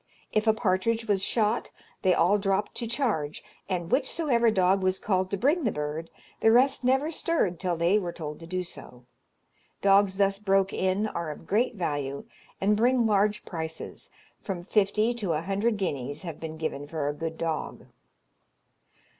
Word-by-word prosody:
If 215 +1 +1
a 220 - +6
partridge 225 +2 0
was 195 -2 +2
shot, 220 +1 +1 0.3
they 185 -1 +3
all 190 +5 +3
dropped 195 +1 0
to 235 - -3
charge, 220 - -1 0.3
and 175 -2 -2
whichsoever 260 -4 +2
dog 190 -1 +3
was 185 0 +1
called 185 -2 0
to 200 - -1
bring 295 - +2
the 225 - +1
bird, 150 +2 -4 0.3
the 225 - +5
rest 260 +3 +4
never 265 +5 +2
stirred 305 - 0
till 180 -3 -1
they 175 +5 +3
were 175 -4 -4
told 150 -3 -7
to 165 - -10
do 185 +1 -2
so. 135 -7 -9 0.8
Dogs 195 -1 +4
thus 195 0 +2
broke 195 -2 +2
in 190 +3 0
are 170 -6 -3
of 150 - -8
great 235 +4 +1
value, 145 -6 -3 0.3
and 205 +2 +3
bring 240 +2 +3
large 210 0 +2
prices; 160 -2 -6 0.3
from 185 -5 -4
fifty 210 +4 +2
to 205 -8 -2
a 155 - -1
hundred 200 +4 0
guineas 145 -5 -3
have 165 -4 -6
been 160 -1 -6
given 145 -3 -4
for 150 -2 -3
a 145 - 0
good 160 +2 -5
dog. 165 -2 -3
195 Hz, 170 wpm, -27 LUFS, 165-220 Hz, 0.8 s, a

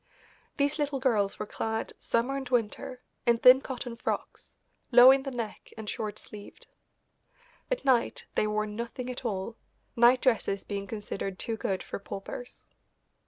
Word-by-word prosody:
These 285 +2 +1
little 285 -2 0
girls 215 -7 +1
were 210 - -3
clad, 220 +1 -3
summer 245 +4 0
and 270 -2 -4
winter, 245 +1 -1 0.2
in 235 -1 +5
thin 255 +3 +8
cotton 250 -3 -5
frocks, 235 - -4 0.4
low 245 +1 +10
in 270 0 +4
the 270 - -4
neck 235 -4 -6
and 220 -1 -7
short 215 0 -4
sleeved. 205 -1 -11 1.0
At - - -2
night 255 -3 +2
they 215 - +1
wore 210 0 0
nothing 235 +4 -5
at 250 - -7
all, 215 +1 -3 0.4
night 240 +2 +6
dresses 215 -6 +1
being 200 -1 -4
considered 195 -2 -5
too 225 - -3
good 190 -3 -2
for - - -6
paupers. 200 +5 -8
235 Hz, 155 wpm, -29 LUFS, 210-255 Hz, 1.0 s, low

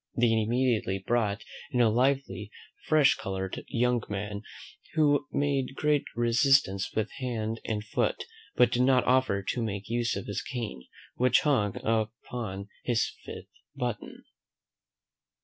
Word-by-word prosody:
They 120 -1 +4
immediately 115 -2 +1
brought 110 +1 0 0.3
in 125 -4 -1
a 115 -3 +5
lively 130 -3 0 0.4
fresh 155 -3 +5
coloured 95 -1 -4
young 125 0 +1
man, 105 0 -4 0.5
who 145 -2 +3
made 140 -2 0
great 150 -1 +1
resistance 120 -4 +3
with 110 0 -1
hand 115 -3 -3
and 105 -1 -2
foot, 105 - -1 0.3
but 125 - +5
did 120 - +1
not 130 0 +4
offer 125 -6 +2
to 120 - -2
make 100 -3 -4
use 120 -1 0
of - - -4
his 100 - -3
cane, 115 - -5 0.3
which 125 +1 +4
hung 110 -10 +1
upon 110 -2 -2
his 120 -2 +1
fifth - - -8 0.3
button. 120 -3 -4
115 Hz, 130 wpm, -28 LUFS, 105-130 Hz, 0.5 s, a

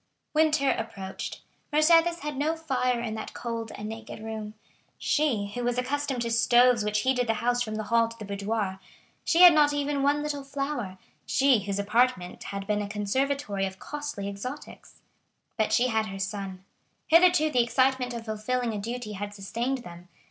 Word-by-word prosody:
Winter 305 -3 +3
approached. 195 -4 -5 0.3
Mercédès 330 +3 +4
had 295 0 -4
no 300 +4 0
fire 255 -6 0
in 230 -2 -3
that 220 0 -6
cold 230 -2 -4
and 210 - -6
naked 225 0 -8
room—she, 220 +2 -3
who 245 - -3
was 245 0 0
accustomed 265 0 -1
to 235 - -2
stoves 240 0 +4
which 210 0 0
heated 255 -2 +1
the 225 - +1
house 245 +2 0
from 215 -3 -2
the 215 - -3
hall 230 +1 +3
to 230 0 -11
the 215 - -7
boudoir; 200 -1 -2 0.4
she 345 +2 +4
had 355 -2 +11
not 295 -1 +4
even 290 -1 -1
one 290 +1 +2
little 290 -2 -3
flower—she 270 -3 -1
whose 200 -1 -2
apartment 205 -3 0
had 200 0 -5
been 210 0 0
a 205 - -4
conservatory 210 0 -1
of 190 0 -9
costly 295 -8 -5
exotics. 225 +9 -8 0.5
But 220 -2 0
she 250 +1 +3
had 220 -1 0
her 195 -1 -6
son. 195 -1 -5 0.4
Hitherto 335 -2 +5
the 250 - +4
excitement 250 +1 +1
of 230 -1 -6
fulfilling 230 +2 -2
a 210 - -3
duty 235 +1 -5
had 205 0 -6
sustained 240 +6 -3
them. 175 0 -11
235 Hz, 170 wpm, -27 LUFS, 210-275 Hz, 0.5 s, had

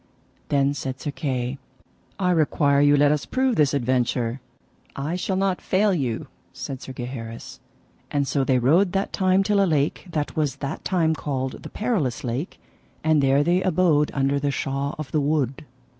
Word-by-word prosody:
Then 140 0 +2
said 135 -2 -5
Sir 145 - -3
Kay: 130 -2 -3 0.6
I 180 -2 +1
require 145 -3 +3
you 145 0 +5
let 145 0 +5
us 150 -1 -1
prove 260 -2 +1
this 150 -6 +3
adventure. 125 -1 0 0.5
I 145 +5 -2
shall 185 +1 -2
not 190 -1 0
fail 200 +2 +2
you, 130 -9 -2 0.3
said 135 -2 -6
Sir - - -8
Gaheris. 120 -2 -7 0.5
And 140 -1 0
so 140 0 +1
they 130 -1 +2
rode 165 +10 +3
that 195 +1 -1
time 190 0 +3
till 200 0 +3
a - - +2
lake 150 +4 0
that 150 -3 -3
was 150 -3 0
that 140 - -5
time 165 -4 +2
called 135 -4 -3
the - - -8
Perilous 200 - -1
Lake, 125 +8 -4 0.4
and 155 -2 +3
there 135 +1 +3
they 175 +3 +2
abode 175 -6 +3
under 140 0 +1
the 145 0 0
shaw 140 +1 -2
of 155 -3 -6
the 155 - +1
wood. 140 -2 -1
145 Hz, 175 wpm, -24 LUFS, 135-175 Hz, 0.6 s, you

